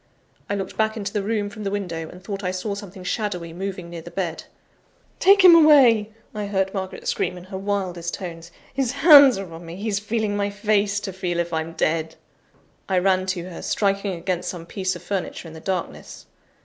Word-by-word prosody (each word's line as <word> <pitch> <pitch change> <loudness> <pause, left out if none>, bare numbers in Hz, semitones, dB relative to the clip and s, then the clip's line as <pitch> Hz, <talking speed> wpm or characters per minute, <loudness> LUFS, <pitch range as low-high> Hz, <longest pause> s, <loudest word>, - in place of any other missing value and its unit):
I 200 - 0
looked 195 -2 -5
back 220 0 +1
into 200 -1 -4
the 210 - 0
room 210 0 -1
from 215 - -8
the 200 - -1
window, 175 -5 -4
and 180 +1 -13
thought 200 0 -5
I 180 - 0
saw 185 +3 -3
something 200 -2 -9
shadowy 180 -5 -3
moving 185 -1 -5
near 170 -1 -7
the 170 - -10
bed. 170 -3 -4 0.7
"Take 395 0 +6
him 360 -2 +10
away!" 270 -10 +6 0.2
I 210 -2 -4
heard 190 -1 0
Margaret 190 -1 -5
scream 180 - -1
in 180 - -10
her 190 +1 -7
wildest 185 -4 -2
tones. 170 -3 -8 0.2
"His 265 -3 -1
hands 285 - +8
are 190 -4 -7
on 165 +1 -9
me: 165 0 -8
he's 200 +1 -2
feeling 215 0 -1
my 205 0 0
face, 205 0 +1
to 195 - -5
feel 180 -2 -3
if 170 0 -2
I'm 160 +1 -2
dead!" 160 0 -1 0.7
I 190 - +2
ran 185 0 +2
to 185 -2 -2
her, 170 - -8
striking 200 -1 0
against 180 +1 -3
some 170 -2 -6
piece 185 0 -2
of 175 - -10
furniture 185 -2 -4
in 160 - -10
the 160 - -9
darkness. 185 +1 -5
195 Hz, 205 wpm, -23 LUFS, 175-205 Hz, 0.7 s, him